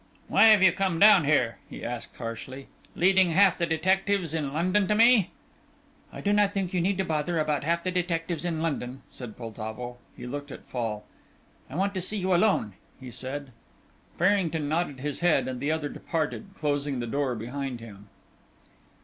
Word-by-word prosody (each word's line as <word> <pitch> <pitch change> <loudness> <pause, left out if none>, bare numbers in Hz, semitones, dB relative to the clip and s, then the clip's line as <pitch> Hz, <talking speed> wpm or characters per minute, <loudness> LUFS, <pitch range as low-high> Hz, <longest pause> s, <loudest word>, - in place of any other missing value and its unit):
"Why - - +5
have 215 -3 +7
you 190 - +7
come 185 -2 -1
down 200 -4 +7
here," 125 -6 +2
he - - -9
asked, 120 0 -6
harshly, 130 +3 -7 0.3
"leading 190 +1 +4
half 195 +2 +5
the 170 - +1
detectives 185 +1 +1
in 150 -4 -2
London 185 +6 +1
to 210 - +2
me?" 225 -3 +5 0.8
"I - - -8
do 205 - +1
not 205 -1 +2
think 190 -1 -2
you 180 - +1
need 190 +1 0
bother 160 +2 -1
about 150 -2 0
half 170 +2 0
the 185 - -1
detectives 170 -2 -2
in 165 -2 -2
London," 135 -5 -3
said 120 -4 -9
Poltavo. 115 +1 -6 0.2
He - - -8
looked 145 +3 -6
at - - -10
Fall. 110 -4 -4 0.6
"I 135 - -9
want 195 +3 0
to 185 - -2
see 210 +4 -2
you 190 -1 0
alone," 175 - +2 0.3
he 130 -2 -9
said. 130 +3 -5 0.7
Farrington 175 -5 +1
nodded 155 -4 -1
his 145 0 -2
head 160 -7 +2
and 130 -1 -4
the 145 +4 -1
other 160 -2 -1
departed, 160 +7 -3
closing 145 -3 -1
the 120 - -2
door 130 +1 -1
behind 125 +3 -5
him. 105 -3 -12
155 Hz, 180 wpm, -27 LUFS, 130-185 Hz, 0.8 s, have